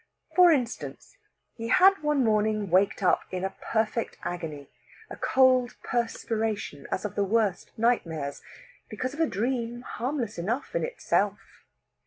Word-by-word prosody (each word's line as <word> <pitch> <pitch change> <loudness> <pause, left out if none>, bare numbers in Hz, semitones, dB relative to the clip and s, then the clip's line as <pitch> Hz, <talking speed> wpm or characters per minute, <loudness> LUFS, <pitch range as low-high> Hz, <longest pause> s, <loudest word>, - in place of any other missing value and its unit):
For 360 -1 +8
instance, 255 - -2 0.4
he 230 -1 -6
had 380 +9 +5
one 300 -3 +2
morning 215 -3 +1
waked 195 +2 +3
up 180 - +4
in 185 0 -4
a 195 - -4 0.2
perfect 225 +1 0
agony 155 -5 -5 0.4
a - - -5
cold 255 -2 +3
perspiration 225 - -2
as 185 - -2
of 210 - -3
the 200 - +1
worst 205 -2 0
nightmares 165 - 0 0.5
because 255 +5 -4
of 300 - -9
a 325 - +3
dream 240 +2 -2
harmless 245 - -3
enough 225 +10 -2
in - - +1
itself. - - -2
225 Hz, 140 wpm, -27 LUFS, 195-255 Hz, 0.5 s, For